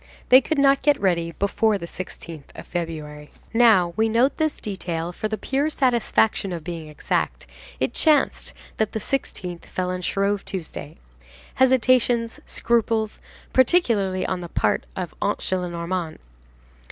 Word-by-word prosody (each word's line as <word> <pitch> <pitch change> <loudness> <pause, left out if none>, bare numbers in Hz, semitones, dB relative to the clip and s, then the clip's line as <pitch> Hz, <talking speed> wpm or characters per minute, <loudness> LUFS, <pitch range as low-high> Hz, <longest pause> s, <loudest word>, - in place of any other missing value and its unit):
They 255 +1 +9
could 315 - -2
not 275 0 +4
get 290 -1 +3
ready 170 -3 +1
before 205 +3 +1
the 170 - -6
16th 170 -4 -8
of - - -9
February. 155 -4 -5 0.2
Now, 215 -7 +5
we 220 +2 +2
note 240 +5 +2
this 315 -2 0
detail, 175 -4 -4
for 215 - -3
the 215 0 -3
pure 275 +6 0
satisfaction 235 -7 +1
of 170 -3 -5
being 165 -2 -6
exact, 150 - -2 0.3
it - - 0
chanced 305 -3 +2 0.3
that 220 -1 0
the 220 - -1
16th 185 -8 -4
fell 180 -1 -3
on 185 0 -3
Shrove 200 +2 0
Tuesday. 160 -4 -6 0.6
Hesitations, 250 -2 +3
scruples, 225 -2 0 0.3
particularly 230 - +3
on 185 -1 -2
the 175 - -7
part - - 0
of 180 -3 -4
Aunt 205 - +1
Gillenormand. 175 -2 -3
200 Hz, 140 wpm, -23 LUFS, 175-240 Hz, 0.6 s, They